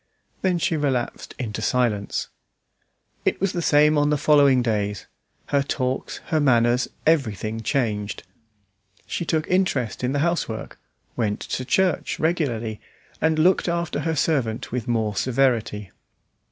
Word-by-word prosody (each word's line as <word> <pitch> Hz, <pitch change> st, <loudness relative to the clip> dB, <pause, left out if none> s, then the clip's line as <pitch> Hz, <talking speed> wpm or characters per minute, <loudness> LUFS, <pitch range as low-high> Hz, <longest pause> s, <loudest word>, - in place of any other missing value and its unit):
Then 185 Hz, -2 st, +2 dB
she 165 Hz, 0 st, 0 dB
relapsed 135 Hz, -5 st, -2 dB
into 110 Hz, -4 st, -4 dB
silence. 110 Hz, -3 st, 0 dB, 1.0 s
It -, -, 0 dB
was 195 Hz, 0 st, 0 dB
the 175 Hz, -, -1 dB
same 150 Hz, -1 st, +4 dB
on 145 Hz, 0 st, +2 dB
the 150 Hz, -, +2 dB
following 140 Hz, -3 st, +4 dB
days; 105 Hz, -3 st, -1 dB, 0.4 s
her 140 Hz, -1 st, +3 dB
talks, 130 Hz, -2 st, -2 dB
her 160 Hz, -, +2 dB
manners, 120 Hz, -3 st, +3 dB, 0.2 s
everything 115 Hz, -, +1 dB
changed. 110 Hz, -6 st, -1 dB, 0.8 s
She 170 Hz, -, -3 dB
took 155 Hz, -1 st, 0 dB
interest 180 Hz, -, 0 dB
in 125 Hz, -, +1 dB
the 145 Hz, -, 0 dB
housework, 170 Hz, -10 st, -3 dB, 0.4 s
went 105 Hz, -4 st, -1 dB
to 130 Hz, -, -4 dB
church 185 Hz, +5 st, +1 dB
regularly, 120 Hz, -10 st, -1 dB, 0.4 s
and 160 Hz, 0 st, +2 dB
looked 180 Hz, +5 st, +3 dB
after 170 Hz, -1 st, -1 dB
her 160 Hz, -1 st, -1 dB
servant 135 Hz, -7 st, 0 dB
with 120 Hz, -2 st, -3 dB
more 110 Hz, -3 st, 0 dB
severity. 115 Hz, -6 st, 0 dB
130 Hz, 135 wpm, -23 LUFS, 115-155 Hz, 1.0 s, same